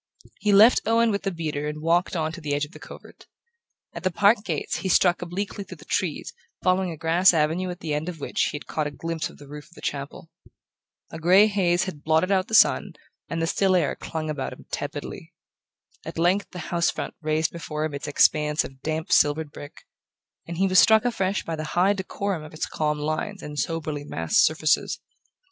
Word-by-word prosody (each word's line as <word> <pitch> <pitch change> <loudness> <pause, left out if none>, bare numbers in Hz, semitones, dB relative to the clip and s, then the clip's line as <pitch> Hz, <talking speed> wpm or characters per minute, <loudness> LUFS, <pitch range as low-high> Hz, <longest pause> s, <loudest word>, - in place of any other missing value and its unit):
He 210 - +1
left 215 +5 +7
Owen 230 0 +3
with 200 - -1
the 195 - -2
beater 155 -4 -3
and 150 0 -5
walked 170 +4 +1
on 160 -2 -1
to 170 +1 -9
the 145 -2 -1
edge 145 +1 0
of 150 - -17
the - - -13
covert. - - -13 0.7
At - - -7
the 185 - +1
park 205 +4 +3
gates - - -2
he 190 - -3
struck 180 0 +3
obliquely 195 +3 -4
through 185 -2 -11
the 150 - -15
trees, 180 -7 -2 0.3
following 185 0 +2
a 165 - -6
grass 170 +3 +4
avenue 165 +4 +1
at 180 0 -7
the 155 -2 -3
end 150 +4 -2
of 170 -3 -8
which - - -2
he - - -3
had 145 - -7
caught 155 -2 -2
a - - -3
glimpse 165 +2 -4
of - - -16
the 145 - -14
roof 150 +1 -9
of 175 - -21
the - - -13
chapel. 145 +3 -5 0.8
A 160 - -7
grey 185 +5 +6
haze 185 -4 +1
had 170 -6 -6
blotted 160 +4 +2
out 190 0 +2
the 220 - -1
sun - - +4 0.4
and 165 0 -2
the - - +2
still 190 +3 +2
air 165 -6 +1
clung 160 -1 -5
about 150 -3 -3
him - - -14
tepidly. - - -6 0.7
At - - -8
length 180 +4 +1
the 175 -2 -7
house 170 0 +2
front - - -4
raised 155 0 0
before 155 -2 -4
him 155 - -4
its 140 +1 -5
expanse 150 +1 +3
of 135 0 -11
damp 155 +1 -3
silvered 150 0 +3
brick, 145 -1 -11 0.6
and 170 0 -6
he 190 - +2
was 185 -1 +5
struck 220 +1 +6
afresh 195 -5 0
by 165 - -4
the 155 - -5
high 190 +3 +4
decorum 195 -2 -3
of 155 0 -11
its - - -2
calm 150 -1 -1
lines 155 +7 -3
and 150 0 -6
soberly 155 -3 -3
massed 80 - +1
surfaces. 155 -1 +1
165 Hz, 215 wpm, -25 LUFS, 150-185 Hz, 0.8 s, left